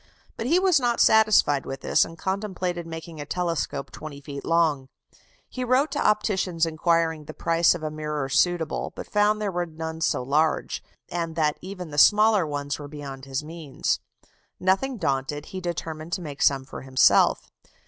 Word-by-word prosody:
But 225 - -4
he 330 +6 +4
was 370 -5 +4
not 240 -2 0
satisfied 215 -10 +5
with 135 - -6
this, - - +3
and 165 - -8
contemplated 185 -3 -3
making 160 -1 -7
a - - -3
telescope 165 -5 -2
20 155 -2 -8
feet 140 -1 -7
long. 155 -6 +1 0.6
He 255 - -5
wrote 255 +5 +2
to - - -1
opticians 190 -5 +1
inquiring 165 -1 0
the - - -9
price 165 +1 +3
of 165 - -7
a 155 - -2
mirror 150 -2 -3
suitable, 165 +3 0
but - - -6
found 210 0 +2
there 210 -2 -1
were 175 -1 -2
none 160 0 -6
so 140 - +1
large, 150 +5 0 0.3
and 165 -2 -3
that 150 -2 +1
even 180 -3 -7
the 145 - 0
smaller 210 -1 +5
ones 145 0 -3
were 145 - -7
beyond 140 -2 -8
his 135 +2 -3
means. 155 -3 -3 0.6
Nothing 215 +8 +1
daunted, 140 -3 -2
he 185 - -4
determined 165 -1 -5
to 190 - -1
make 145 -3 -7
some 135 -1 +3
for - - -9
himself. 130 -2 +3
165 Hz, 175 wpm, -25 LUFS, 145-190 Hz, 0.6 s, satisfied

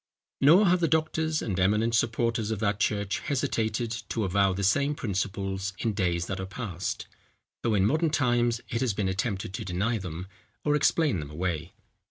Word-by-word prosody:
Nor 165 +9 +7
have 180 -1 +4
the 170 - +2
doctors 160 0 0
and 95 -4 -2
eminent 105 +5 +2
supporters 115 -1 +1
of 110 - -1
that 105 -1 0
church 100 -1 0
hesitated 115 -4 -1 0.2
to 115 - -1
avow 95 0 +2
the 95 +2 -3
same 140 +9 +2
principles 95 -3 -2
in 110 +2 -1
days 90 -4 0
that 95 0 -4
are 95 - -4
past, 100 -4 -4 0.6
though 115 -2 +1
in 95 -1 +3
modern 155 +8 +2
times, 120 -5 +1
it 115 - -2
has 120 -6 +1
been 100 -2 0
attempted 95 0 -2
to - - -4
deny 100 +6 -1
them, 90 -1 -6 0.4
or 150 - +3
explain 150 - +2
them 75 -2 -6
away. 80 +1 -3
105 Hz, 180 wpm, -28 LUFS, 95-125 Hz, 0.6 s, Nor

